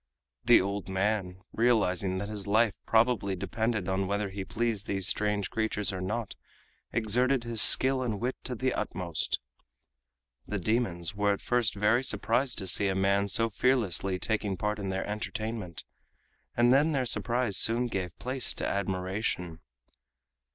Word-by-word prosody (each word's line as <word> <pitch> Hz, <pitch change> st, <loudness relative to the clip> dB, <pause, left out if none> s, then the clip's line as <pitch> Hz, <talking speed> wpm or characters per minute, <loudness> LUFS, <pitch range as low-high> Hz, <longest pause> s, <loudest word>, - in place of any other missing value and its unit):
The -, -, +7 dB
old 100 Hz, 0 st, -3 dB
man, 95 Hz, -1 st, -1 dB
realizing 100 Hz, -5 st, +1 dB
that 100 Hz, +2 st, -3 dB
his 105 Hz, -2 st, -4 dB
life 110 Hz, +1 st, +3 dB
probably 110 Hz, -4 st, +2 dB
depended 110 Hz, 0 st, -2 dB
on 95 Hz, 0 st, 0 dB
whether 100 Hz, +1 st, -1 dB
he 95 Hz, 0 st, -5 dB
pleased 110 Hz, 0 st, -2 dB
these 95 Hz, -2 st, -1 dB
strange 105 Hz, -1 st, 0 dB
creatures 110 Hz, -2 st, -1 dB
or 90 Hz, -, -4 dB
not, 110 Hz, +3 st, -3 dB, 0.6 s
exerted 120 Hz, +4 st, +1 dB
his 115 Hz, -2 st, +1 dB
skill 130 Hz, 0 st, +4 dB
and 110 Hz, -5 st, -2 dB
wit 125 Hz, +2 st, -2 dB
to 125 Hz, -, -3 dB
the 130 Hz, +3 st, -1 dB
utmost. 85 Hz, -3 st, -2 dB, 1.1 s
The 105 Hz, -, -2 dB
demons 95 Hz, -4 st, -1 dB
were 100 Hz, 0 st, +1 dB
at 100 Hz, -, -6 dB
first 120 Hz, -5 st, +1 dB
very 110 Hz, +5 st, +2 dB
surprised 125 Hz, 0 st, 0 dB
to 95 Hz, -, -1 dB
see 100 Hz, +2 st, +4 dB
a 95 Hz, -, 0 dB
man 100 Hz, +1 st, +2 dB
so 115 Hz, +3 st, +2 dB
fearlessly 100 Hz, -6 st, +1 dB
taking 105 Hz, -1 st, -1 dB
part 105 Hz, +2 st, -2 dB
in 100 Hz, -1 st, -3 dB
their 95 Hz, 0 st, -2 dB
entertainment, 105 Hz, -3 st, -4 dB, 0.7 s
and 120 Hz, +1 st, +5 dB
then 150 Hz, +4 st, +3 dB
their 135 Hz, -3 st, 0 dB
surprise 120 Hz, -2 st, 0 dB
soon 115 Hz, +2 st, +4 dB
gave 95 Hz, -7 st, -4 dB
place 130 Hz, +4 st, -2 dB
to -, -, -3 dB
admiration. 95 Hz, -3 st, -2 dB
105 Hz, 155 wpm, -29 LUFS, 95-115 Hz, 1.1 s, The